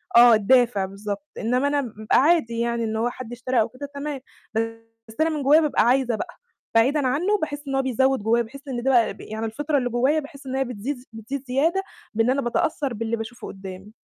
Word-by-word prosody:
آه 240 0 +9
الدافع 220 -2 +3
بالضبط، 200 +1 -6
إنّما 250 +5 +1
أنا 285 0 +1
ب 215 -3 -8
عادي 275 -7 +4
يعني 235 0 0
إن 220 0 -2
هو 230 +2 +1
حد 245 -1 -8
اشترى 245 -1 0
أو 220 - 0
كده 280 +3 -8
تمام، 280 -1 -4 0.9
بس 220 - -13
أنا 325 - +3
من 300 -3 -2
جوايا 300 +4 +6
بابقى 300 -7 +2
عايزة 245 -1 +3
بقى، 350 +9 -6 0.4
بعيدا 265 +4 +4
عنّه 360 +11 +1
باحس 290 -2 -4
إن 270 - -1
هو 270 - +3
بيزوِّد 265 0 +2
جوايا، 235 +2 +3
باحس 275 +5 -12
إن 245 -2 -3
ده 270 - +3
بقى 235 -3 +3
يعني 220 +1 -5
الفطرة 290 +7 -1
اللي 245 -2 0
جوايا 260 +6 +2
باحس 280 -2 -11
إن 260 - -3
هي 270 - +2
بتزيد 250 +3 -4
ز 250 - -16
بتزيد 250 +5 -5
زيادة 325 +9 +1 0.3
بإن 225 +3 +2
أنا 275 +2 +2
باتأثّر 270 +2 -1
باللي 230 +1 -2
باشوفُه 225 +2 -7
قُدّامي. 195 +1 -9
250 Hz, 215 wpm, -24 LUFS, 225-280 Hz, 0.9 s, آه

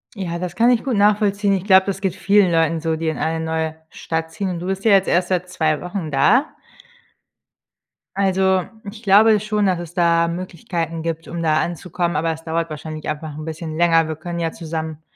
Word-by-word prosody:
Ja, 170 -3 -4
das 175 -1 -5
kann 235 +2 +5
ich 235 - +1
gut 255 -5 -1
nachvollziehen. 205 -1 +2
Ich 190 -1 -1
glaube, 190 -2 +5
das 195 0 -3
geht 190 -3 -1
vielen 200 -3 +3
Leuten 165 -1 +1
so, 160 -1 -1
die 160 0 -3
in 160 - -1
eine 160 0 -1
neue 160 -1 -2
Stadt 160 0 -4
ziehen. 190 +3 -3
Und 175 -2 -4
du 180 - -6
bist 195 0 -3
ja 220 - +4
jetzt 195 -1 +4
erst 175 +1 +1
seit 180 -1 -1
2 155 -4 0
Wochen 180 -3 -5
da. 220 - +3 1.7
Also, 190 -1 +2 0.3
ich 220 +2 -13
glaube 210 +2 +5
schon, 210 0 -1
dass 180 -2 +1
es 175 -1 -8
da 170 -2 +3
Möglichkeiten 170 -2 -4
gibt, 165 0 -4
um 170 0 -4
da 155 -1 +2
anzukommen, 175 -1 -2
aber 165 +1 0
es 160 +1 -11
dauert 165 0 -2
wahrscheinlich 155 0 -7
einfach 155 -1 -5
'n 155 - -7
bisschen 160 0 -6
länger. 165 -2 +3
Wir 155 - -4
können 170 +1 -5
ja 165 -1 -1
zusammen 160 -1 -5
170 Hz, 210 wpm, -20 LUFS, 160-195 Hz, 1.7 s, kann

